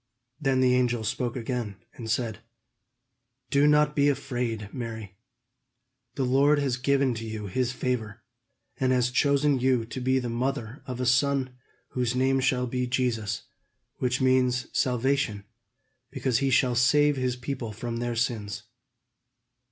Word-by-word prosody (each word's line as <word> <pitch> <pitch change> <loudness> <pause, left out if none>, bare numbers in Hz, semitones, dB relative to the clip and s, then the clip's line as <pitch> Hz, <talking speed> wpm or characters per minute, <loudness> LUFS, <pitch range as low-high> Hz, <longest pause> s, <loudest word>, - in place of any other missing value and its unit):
Then 135 -4 +1
the 125 -1 +4
angel 120 -2 +1
spoke 120 +3 -2
again, 120 -4 -3 0.2
and 115 -2 -8
said: 115 -2 -1 1.1
"Do 140 +1 +4
not 150 0 +4
be 145 0 +4
afraid, 120 -6 -2
Mary. 110 -6 -6 1.0
The 135 - 0
Lord 140 +4 +4
has 135 -3 0
given 135 0 +2
to 115 0 -6
you 110 -2 -5
his 125 +5 -1
favor, 120 -4 -3 0.6
and 130 -1 +2
has 125 -1 +2
chosen 140 +1 +2
you 125 -2 +2
to 125 +3 -6
be 130 +1 +2
the 125 -2 -1
mother 125 +1 -3
of 125 -1 -5
a 125 - -1
son 130 +1 +2 0.3
whose 125 -1 -1
name 135 +1 +2
shall 130 -1 +1
be 125 +1 -2
Jesus, 115 -4 -1 0.5
which 125 0 0
means 130 -1 +2
'salvation,' 125 -4 0 0.6
because 130 -2 0
he 135 -1 +1
shall 125 0 +3
save 145 +5 +4
his 130 -2 -1
people 125 -2 -5
from 115 +2 -5
their 120 0 -2
sins. 105 -4 -2
125 Hz, 145 wpm, -27 LUFS, 115-135 Hz, 1.1 s, the